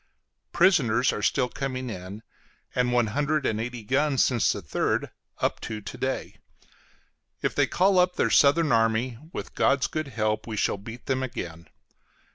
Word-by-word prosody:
Prisoners 130 - +3
are - - -4
still 125 - +2
coming 130 0 -4
in, 100 0 -7 0.5
and 125 -1 +1
one 120 -1 +3
hundred 150 +2 0
and 110 0 0
eighty 120 -1 -5
guns 140 +4 +2
since 120 -5 +2
the - - -3
3d - - -1 0.3
up - - -1
to 110 -1 -5
to 105 - -8
day. 130 0 -3 1.1
If - - 0
they - - +2
call 185 +1 +3
up 180 0 +3
their - - +1
southern 150 +2 +4
army, 115 +1 +1
with - - -6
God's 135 -1 +2
good 155 -2 -3
help 110 -3 -1
we 110 -2 -4
shall 100 - +1
beat 115 +4 -10
them 130 -1 0
again. 85 -10 -6
125 Hz, 165 wpm, -26 LUFS, 110-140 Hz, 1.1 s, southern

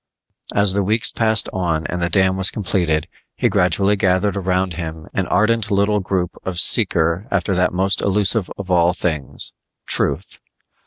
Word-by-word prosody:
As 100 -2 +2
the 100 - 0
weeks 110 +4 +2
passed 110 -2 +1
on 85 -4 -2
and 90 +1 -4
the 85 - 0
dam 95 +1 +2
was 95 0 +3
completed, 85 -7 -1 0.3
he - - 0
gradually 95 +3 +1
gathered 95 0 0
around 95 -1 -1
him 80 -2 -7
an 95 - -2
ardent 110 +3 +1
little 100 +1 +1
group 95 -2 -2
of 95 -2 -5
seeker 85 -1 +2
after 100 -1 -1
that 90 0 +1
most 95 +2 +1
elusive 100 +1 0
of 95 -2 -6
all 90 0 +3
things 80 -6 -4 0.3
"Truth". - - +1
95 Hz, 160 wpm, -19 LUFS, 90-100 Hz, 0.3 s, was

